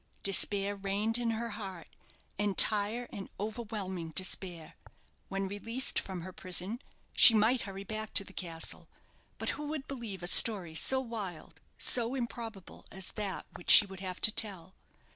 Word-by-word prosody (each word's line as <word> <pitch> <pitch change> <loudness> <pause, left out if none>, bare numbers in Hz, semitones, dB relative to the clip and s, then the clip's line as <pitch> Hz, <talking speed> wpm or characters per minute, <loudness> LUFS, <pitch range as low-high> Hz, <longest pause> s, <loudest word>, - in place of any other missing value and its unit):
Despair 200 +1 +1
reigned 200 +4 -2
in 235 -1 -2
her 230 +1 -4
heart, 195 -6 -9 0.5
entire 210 +3 +3
and 195 - -9
overwhelming 205 -5 -6
despair. 175 -1 -4 0.5
When 195 0 -4
released 230 +6 0
from 185 -3 -8
her 185 +2 -10
prison, 185 +7 -1 0.3
she 230 - +9
might 225 +4 +1
hurry 195 0 -9
back 215 +1 -7
to - - +7
the 195 - -15
castle. 165 -4 -5 0.5
But - - -4
who 295 +1 -5
would 300 -2 -6
believe 225 -9 -8
a - - -3
story 180 -2 +6
so 265 +11 +2
wild, 215 -9 -8 0.2
so 240 +1 +2
improbable, 230 -6 -8
as 190 -1 -8
that 205 -3 -6
which 175 - -10
she - - +9
would 190 -1 -12
have 185 -1 -7
to 215 - +8
tell? 190 -5 -1
205 Hz, 155 wpm, -30 LUFS, 190-230 Hz, 0.5 s, she